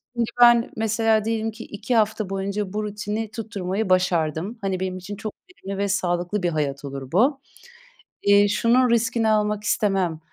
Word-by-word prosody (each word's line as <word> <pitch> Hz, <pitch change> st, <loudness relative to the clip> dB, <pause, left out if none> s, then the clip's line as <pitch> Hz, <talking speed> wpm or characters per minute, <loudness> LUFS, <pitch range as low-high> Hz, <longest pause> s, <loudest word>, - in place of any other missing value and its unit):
Şimdi 235 Hz, -1 st, 0 dB
ben 240 Hz, -1 st, +6 dB
mesela 220 Hz, 0 st, +1 dB
diyelim 225 Hz, 0 st, -1 dB
ki 225 Hz, +2 st, -10 dB
2 210 Hz, +4 st, -3 dB
hafta 215 Hz, -2 st, +1 dB
boyunca 195 Hz, 0 st, -3 dB
bu 215 Hz, -, -2 dB
rutini 210 Hz, +1 st, -4 dB
tutturmayı 205 Hz, -3 st, -3 dB
başardım. 180 Hz, +3 st, +1 dB
Hani 190 Hz, -2 st, -2 dB
benim 185 Hz, -1 st, -3 dB
için 195 Hz, +3 st, -7 dB
çok 215 Hz, +1 st, -6 dB, 0.2 s
verimli 195 Hz, -, -7 dB
ve 200 Hz, -, 0 dB
sağlıklı 180 Hz, 0 st, -1 dB
bir 175 Hz, -, +2 dB
hayat 145 Hz, -3 st, -2 dB
olur 135 Hz, -1 st, -7 dB
bu. 265 Hz, -, +2 dB, 0.8 s
Eee, 200 Hz, 0 st, +5 dB
şunun 240 Hz, +5 st, +3 dB
riskini 230 Hz, -1 st, +1 dB
almak 210 Hz, -1 st, +1 dB
istemem. 195 Hz, -6 st, 0 dB
205 Hz, 165 wpm, -23 LUFS, 185-225 Hz, 0.8 s, ben